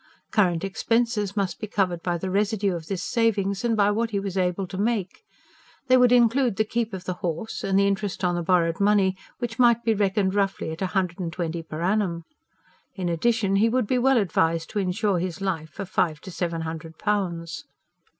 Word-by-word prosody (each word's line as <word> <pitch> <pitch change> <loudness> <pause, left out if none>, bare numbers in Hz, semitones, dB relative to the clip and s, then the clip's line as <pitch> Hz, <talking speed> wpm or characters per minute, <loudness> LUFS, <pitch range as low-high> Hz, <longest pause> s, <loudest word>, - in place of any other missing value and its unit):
Current 180 -6 +2
expenses 210 +1 0
must 195 -2 -1
be 215 - -4
covered 185 -5 0
by 175 -1 -1
the 185 +2 -4
residue 200 0 +1
of 165 -2 -6
this 195 -3 -3
savings, 205 -4 0
and 230 -2 +1
by 205 0 +4
what 225 +2 0
he 205 -3 -1
was 195 -1 -4
able 185 0 0
to 185 +1 -7
make. 210 - -1 0.7
They 255 - +7
would 250 -1 +5
include 245 -1 +4
the 220 - +2
keep 225 +1 -2
of 190 -2 -6
the 185 - -3
horse, 175 +6 -3
and 195 0 +1
the 200 - +4
interest 200 -1 -1
on 180 -1 +2
the 175 - -1
borrowed 165 -1 +2
money, 200 -2 +3 0.2
which 235 -2 -5
might 235 -1 +5
be 225 - +2
reckoned 195 -2 +1
roughly 195 -5 0
at 160 - -7
a 190 - +1
hundred 180 -1 -1
and 170 -3 -3
twenty 165 0 -3
per 160 0 -6
annum. 185 -3 0 0.7
In 185 -3 -2
addition, 195 +3 +1
he 220 +3 +4
would 250 0 +1
be 250 +4 +1
well 265 +1 +4
advised 165 -5 +1
to 210 - -1
insure 195 0 0
his 180 +1 -3
life 170 -5 -2
for 200 - -6
five 160 -4 0
to 190 - -9
seven 170 -2 -2
hundred 160 0 -6
pounds. 175 -6 -2
195 Hz, 210 wpm, -25 LUFS, 175-215 Hz, 0.7 s, They